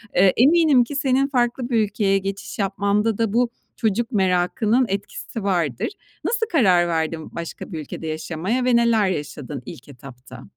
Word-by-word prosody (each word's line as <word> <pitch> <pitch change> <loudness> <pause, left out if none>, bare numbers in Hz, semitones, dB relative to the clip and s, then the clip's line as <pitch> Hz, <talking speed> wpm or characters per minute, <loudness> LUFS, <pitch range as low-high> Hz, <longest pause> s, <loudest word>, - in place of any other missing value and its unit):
Eee, 185 0 +5
eminim 290 0 +5
ki 260 +4 -7
senin 270 0 +2
farklı 245 -2 0
bir 235 -3 +2
ülkeye 200 -1 +1
geçiş 195 +2 -5
yapmanda 200 +2 0
da 225 -3 0
bu 240 +1 +2 0.3
çocuk 230 +2 0
merakının 200 +5 +2
etkisi 200 +2 -5
vardır. 170 -11 0 0.4
Nasıl 460 -1 0
karar 185 - +4
verdin 160 -1 -3
başka 170 +4 -7
bir 165 - -4
ülkede 155 +2 -7
yaşamaya 170 +10 -2
ve 250 -1 +3
neler 230 -4 +3
yaşadın 145 -4 -5
ilk 130 - -10
etapta? 125 -1 -12
200 Hz, 155 wpm, -22 LUFS, 175-240 Hz, 0.4 s, Eee